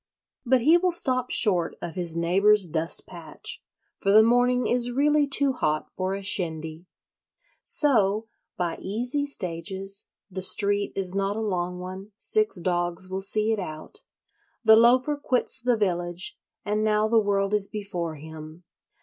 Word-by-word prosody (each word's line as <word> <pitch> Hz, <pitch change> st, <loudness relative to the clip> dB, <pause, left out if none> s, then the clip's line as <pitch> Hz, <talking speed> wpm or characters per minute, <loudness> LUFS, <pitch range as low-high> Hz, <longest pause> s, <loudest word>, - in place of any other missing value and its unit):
But 260 Hz, 0 st, +3 dB
he 320 Hz, +8 st, +5 dB
will 365 Hz, 0 st, +1 dB
stop 255 Hz, -7 st, +2 dB
short 180 Hz, -6 st, +3 dB
of 170 Hz, -, -6 dB
his 175 Hz, -3 st, -2 dB
neighbour's 195 Hz, +4 st, +3 dB
dust 160 Hz, +1 st, 0 dB
patch; -, -, -8 dB, 0.4 s
for 195 Hz, -, +1 dB
the 215 Hz, +2 st, +7 dB
morning 245 Hz, +2 st, +2 dB
is 245 Hz, 0 st, +1 dB
really 290 Hz, +3 st, +2 dB
too 275 Hz, 0 st, +2 dB
hot 155 Hz, -10 st, -2 dB
for 185 Hz, +1 st, -2 dB
a 200 Hz, -, -7 dB
shindy. 160 Hz, -3 st, -2 dB, 0.7 s
So, 220 Hz, -7 st, +2 dB, 0.3 s
by 175 Hz, -2 st, -3 dB
easy 245 Hz, +9 st, -2 dB
stages 190 Hz, -, -3 dB, 0.2 s
(the 190 Hz, +1 st, -5 dB
street 200 Hz, +1 st, +2 dB
is 185 Hz, -2 st, -2 dB
not 195 Hz, +1 st, -1 dB
a -, -, -3 dB
long 180 Hz, -4 st, -2 dB
one: 185 Hz, +3 st, -9 dB
six 430 Hz, -, 0 dB
dogs 175 Hz, +1 st, -1 dB
will 190 Hz, +1 st, -3 dB
see 215 Hz, +3 st, 0 dB
it 220 Hz, -, 0 dB
out), 180 Hz, -, -7 dB, 0.6 s
the 220 Hz, -1 st, +7 dB
Loafer 250 Hz, +6 st, +4 dB
quits 260 Hz, -2 st, -1 dB
the 245 Hz, -1 st, +1 dB
village; 175 Hz, -3 st, -2 dB, 0.3 s
and 210 Hz, +1 st, -1 dB
now 215 Hz, 0 st, +2 dB
the 225 Hz, 0 st, +3 dB
world 200 Hz, -1 st, 0 dB
is 205 Hz, -1 st, +1 dB
before 180 Hz, -6 st, -5 dB
him. 155 Hz, +2 st, -11 dB
200 Hz, 155 wpm, -25 LUFS, 180-240 Hz, 0.7 s, the